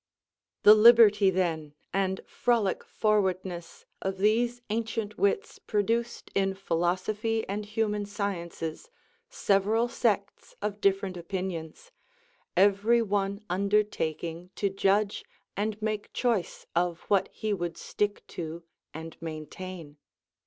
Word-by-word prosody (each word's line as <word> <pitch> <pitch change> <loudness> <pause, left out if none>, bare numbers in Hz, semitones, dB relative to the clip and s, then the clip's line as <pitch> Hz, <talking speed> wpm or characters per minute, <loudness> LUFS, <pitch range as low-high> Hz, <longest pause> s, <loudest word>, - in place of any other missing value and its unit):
The 210 - +10
liberty, 215 -2 +7
then, 165 -5 -1 0.2
and 190 -1 0
frolic 230 -6 +1
forwardness 185 -5 -1 0.2
of 190 0 -2
these 235 +5 +2
ancient 225 -1 -2
wits 200 - 0
produced 230 +3 -1
in 195 0 +1
philosophy 195 +5 -1
and 205 +2 -3
human 210 -1 -1
sciences 180 - -4 0.4
several 210 +4 +2
sects 205 -4 -1
of 205 0 -3
different 195 -1 +1
opinions, 175 - -5 0.7
every 205 +5 +4
one 200 0 -1
undertaking 180 -4 -1
to 200 -2 0
judge 200 +1 +1 0.3
and 210 +1 -2
make 215 -1 -2
choice 230 -8 -1
of 175 0 +1
what 200 -2 +1
he 215 -1 -2
would 175 -3 -3
stick 205 0 -2
to 165 0 -6 0.3
and 160 0 -8
maintain. 160 0 -7
200 Hz, 110 wpm, -28 LUFS, 180-215 Hz, 0.7 s, The